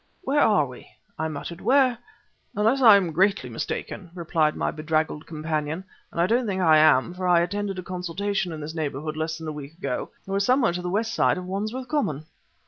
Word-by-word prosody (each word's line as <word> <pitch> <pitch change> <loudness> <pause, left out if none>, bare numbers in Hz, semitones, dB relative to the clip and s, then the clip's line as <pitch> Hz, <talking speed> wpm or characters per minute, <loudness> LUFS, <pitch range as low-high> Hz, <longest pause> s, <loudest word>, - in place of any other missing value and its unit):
"Where 290 -1 +1
are 205 - +4
we?" 125 -2 -12 0.3
I 160 - 0
muttered 160 +3 -6
"where 260 -2 +4 0.3
..." - - -38
"Unless 225 +6 +2
I 225 -5 +9
am 185 -4 +2
greatly 185 -6 +1
mistaken," 175 - -5
replied 160 -3 +1
my - - -1
bedraggled 155 0 -2
companion, 155 +1 -3 0.3
"and - - -6
I 170 - +4
don't 235 +4 +1
think 190 -2 -1
I 160 -4 +5
am, 155 +1 +4
for 185 0 -3
I 175 -1 +5
attended 195 +2 -2
a 185 - -5
consultation 185 +1 -2
in 155 -1 -6
this 150 +2 -6
neighborhood 155 -1 -3
less 160 0 -2
than 160 -1 -8
a - - -2
week 150 +1 -9
ago, 125 -8 -3 0.2
we 195 +1 -1
somewhere 245 -1 +3
on 180 - -3
the 180 - -3
west 220 +4 -1
side - - +2
of 180 - -5
Wandsworth 215 +7 -4
Common!" 160 - -1
175 Hz, 210 wpm, -25 LUFS, 155-205 Hz, 0.3 s, I